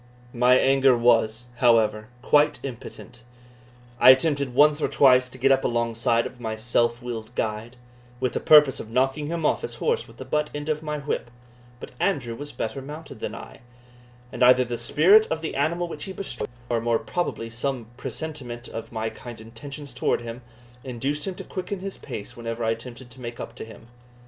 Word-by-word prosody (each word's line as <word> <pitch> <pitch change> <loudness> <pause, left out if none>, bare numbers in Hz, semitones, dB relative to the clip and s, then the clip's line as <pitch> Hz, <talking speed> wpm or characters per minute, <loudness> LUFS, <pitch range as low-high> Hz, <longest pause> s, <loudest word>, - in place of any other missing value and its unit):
My 125 +1 +5
anger 135 -1 +4
was, 115 -1 +2
however, 110 -3 +3 0.2
quite 150 +3 +4
impotent. 125 -2 -9 0.8
I - - +8
attempted 140 -1 +4
once 150 +2 +5
or - - +2
twice 130 -2 +4
to 130 - -12
get 135 +2 +3
up 135 - +3
alongside 115 0 +1
of 125 - -8
my 110 -2 -3
self 120 +1 0
willed 120 -1 -6
guide, 110 +3 -3 0.4
with 130 -1 -1
the - - -1
purpose 150 -4 +6
of 110 - -8
knocking 135 +5 0
him 165 0 -2
off - - +2
his 465 - -5
horse 470 0 -1
with - - -16
the - - -8
butt 150 0 0
end 145 +1 -4
of 155 0 0
my 150 -1 -3
whip; 140 -4 -3 0.5
but - - -9
Andrew 135 -12 0
was 145 +5 -8
better 130 +1 -4
mounted 150 +4 -9
than - - -4
I, - - -11 0.7
and - - -7
either 125 0 +6
the 120 0 -3
spirit 170 - +5
of 160 0 -2
the 160 - -4
animal 170 +5 0
which 150 - -7
he 190 - -6
bestrode, 190 -11 -4 0.2
or 120 -2 0
more 115 0 +2
probably 115 -10 -3
some 125 +1 -2
presentiment 130 -2 -5
of 115 - -7
my 110 -1 -3
kind 120 -2 -10
intentions 135 +5 -8
towards 120 -1 0
him, 115 +1 -7 0.4
induced 135 +5 -2
him 190 - -3
to - - -7
quicken 190 +1 -5
his 195 0 -5
pace 105 +4 -7
whenever 115 0 -5
I 115 - +2
attempted 120 +2 -7
to 125 +2 -12
make 120 -1 -7
up - - -6
to - - -8
him. 110 0 -13
125 Hz, 195 wpm, -25 LUFS, 115-150 Hz, 0.8 s, I